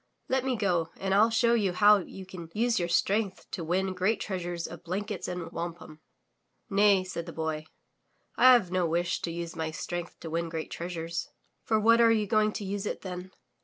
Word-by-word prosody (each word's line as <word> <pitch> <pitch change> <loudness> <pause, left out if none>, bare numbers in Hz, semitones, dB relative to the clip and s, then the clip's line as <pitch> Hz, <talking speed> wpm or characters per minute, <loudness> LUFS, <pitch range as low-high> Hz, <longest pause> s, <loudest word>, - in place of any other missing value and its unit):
Let 260 0 +1
me 260 -1 0
go 175 -7 0
and 190 0 -1
ril 215 +3 +5
show 235 +1 +3
you 205 -6 +2
how 205 +2 +6
you 190 +1 -9
can 180 -3 -9
use 230 0 +2
your 175 -1 -1
strength 195 +3 +1
to 170 - -4
win 185 +3 0
great 185 +5 +1
treasures 175 -3 -3
of 170 - -8
blankets 190 +3 -4
and 175 -2 -5
wampum.'' 165 -2 -6 0.7
"Nay," 200 -1 +5
said 180 -2 -6
the - - -5
Boy, 160 -1 -3 0.7
"I 255 - +7
have 210 -8 +3
no 180 -2 +1
wish 170 +2 0
to - - -3
use 170 +1 -5
my 160 -1 -2
strength 175 +2 -5
to 165 - -6
win 165 0 -1
great 160 -1 -5
treasures." 170 -1 -4 0.4
"For 220 -1 +2
what 230 +2 +5
are 230 -1 +6
you 215 -2 +2
going 215 +1 +2
to 205 - -5
use 200 +1 -3
it - - -4
then?" 180 -1 -6
185 Hz, 200 wpm, -29 LUFS, 170-210 Hz, 0.7 s, I